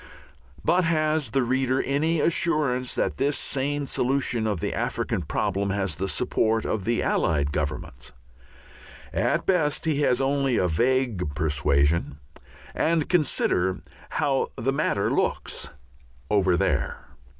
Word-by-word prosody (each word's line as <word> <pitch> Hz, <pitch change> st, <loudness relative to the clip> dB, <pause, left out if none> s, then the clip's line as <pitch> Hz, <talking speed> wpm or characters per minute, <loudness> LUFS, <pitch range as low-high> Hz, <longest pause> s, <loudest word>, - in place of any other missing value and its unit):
But 180 Hz, +1 st, +3 dB
has 155 Hz, -2 st, +1 dB
the 135 Hz, -2 st, +1 dB
reader 130 Hz, +1 st, +1 dB
any 155 Hz, +4 st, +1 dB
assurance 150 Hz, -7 st, +1 dB
that -, -, -1 dB
this 140 Hz, +1 st, +1 dB
sane 145 Hz, +1 st, -1 dB
solution 125 Hz, -4 st, 0 dB
of 105 Hz, -5 st, -1 dB
the -, -, -2 dB
African -, -, -2 dB
problem 100 Hz, +2 st, -1 dB
has 95 Hz, -5 st, -1 dB
the 95 Hz, +5 st, -3 dB
support 110 Hz, 0 st, 0 dB
of 105 Hz, -3 st, -2 dB
the 115 Hz, 0 st, 0 dB
Allied 70 Hz, -2 st, +1 dB
Governments? 70 Hz, -4 st, -4 dB, 1.0 s
At -, -, 0 dB
best 160 Hz, -6 st, +1 dB
he 150 Hz, -2 st, +1 dB
has 125 Hz, -4 st, +2 dB
only 135 Hz, -2 st, +1 dB
a 90 Hz, -, +2 dB
vague 110 Hz, -, 0 dB
persuasion. 75 Hz, 0 st, +1 dB, 0.6 s
And 160 Hz, -2 st, +1 dB
consider 95 Hz, -, +1 dB, 0.3 s
how 140 Hz, -3 st, +1 dB
the 135 Hz, +5 st, 0 dB
matter 135 Hz, -8 st, 0 dB
looks -, -, -1 dB, 0.6 s
"over 95 Hz, -4 st, +3 dB
there." -, -, -1 dB
125 Hz, 130 wpm, -25 LUFS, 95-145 Hz, 1.0 s, But